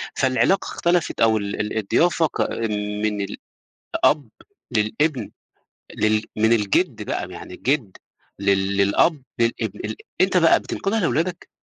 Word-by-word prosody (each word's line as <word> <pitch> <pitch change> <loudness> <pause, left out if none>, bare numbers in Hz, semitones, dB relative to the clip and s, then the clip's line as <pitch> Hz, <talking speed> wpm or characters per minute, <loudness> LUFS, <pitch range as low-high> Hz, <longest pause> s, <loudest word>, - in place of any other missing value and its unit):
فالعلاقة 135 +9 +2
اختلفت 175 -1 0
أو 110 -1 +5
ال 100 -1 -4
ال 105 +1 -3
الضيافة 165 - +2
كا 115 -5 -2 0.3
من 105 -1 0 0.6
الأب 145 -6 0 0.5
للإبن 115 +3 0 0.6
لل 110 0 +2
من 110 +1 +3
الجد 105 -4 +1
بقى - - -3
يعني - - -9
الجد 125 -4 -1 0.4
لل 100 0 +1
للأب 100 - +3 0.2
للإبن 115 0 -1
ال - - -5 0.2
أنت - - +3
بقى - - +5
بتنقلها 220 +2 -2
لولادك؟ 170 0 -1
115 Hz, 125 wpm, -22 LUFS, 105-155 Hz, 0.6 s, أو